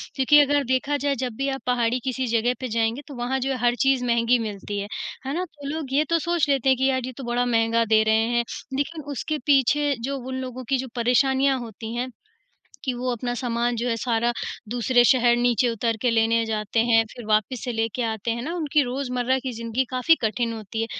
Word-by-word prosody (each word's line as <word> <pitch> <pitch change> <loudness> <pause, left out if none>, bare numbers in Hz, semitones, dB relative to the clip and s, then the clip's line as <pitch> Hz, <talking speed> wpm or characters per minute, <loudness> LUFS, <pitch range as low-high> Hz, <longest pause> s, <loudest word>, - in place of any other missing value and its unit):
क्योंकि 280 +2 +5
अगर 290 0 +2
देखा 260 +3 0
जाए 285 0 0
जब 255 -2 -3
भी 275 0 -1
आप 270 0 -4
पहाड़ी 245 0 +1
किसी 260 -1 -2
जगह 230 +1 +1
पे 255 - -3
जाएँगे, 230 +3 0
तो 285 - -9
वहाँ 245 +2 -1
जो 265 +1 -1
है 265 - -1
हर 240 0 +3
चीज़ 270 -2 +3
महँगी 235 0 +3
मिलती 205 -2 -4
है। 200 - -4 0.4
है 270 - -2
ना? 360 +4 -1
तो 295 -5 -11
लोग 295 -3 -4
ये 290 +2 +4
तो 335 0 +3
सोच 340 -2 0
लेते 270 -2 +2
हैं 260 - +4
कि 265 +1 +2
यार 260 -1 +1
ये 255 - -5
तो 270 - -7
बड़ा 240 0 0
महँगा 230 -1 +2
दे 220 0 +4
रहे 220 +1 +2
हैं 240 - +3 0.3
लेकिन 310 +2 -3
उसके 305 +2 -3
पीछे 285 +1 +3
जो 275 +2 -2
उन 260 0 -6
लोगों 255 0 -6
की 270 - +3
जो 260 +1 -4
परेशानियाँ 265 +3 +2
होती 225 -1 -7
हैं, 250 +2 -2 0.8
कि 260 - 0
वो 250 +1 -2
अपना 245 +1 -3
सामान 240 -1 -1
जो 235 +2 -2
है, 230 - +1
सारा 235 +1 0 0.4
दूसरे 245 +1 +3
शहर 245 -2 +4
नीचे 245 +1 +2
उतर 230 0 -1
के 250 - +2
लेने 230 0 +2
जाते 215 0 -1
हैं 225 -1 +4
फिर 240 - -10
वापस 215 +3 0
से 250 - -2
लेके 225 +1 -2
आते 220 0 -2
हैं 235 +1 -3
ना? 330 - -4
उनकी 305 -3 +1
रोज़मर्रा 250 0 -1
की 260 - -3
ज़िंदगी 230 +3 -1
काफ़ी 255 +6 +4
कठिन 230 +1 0
होती 220 0 -5
है। - - 0
245 Hz, 230 wpm, -24 LUFS, 230-270 Hz, 0.8 s, क्योंकि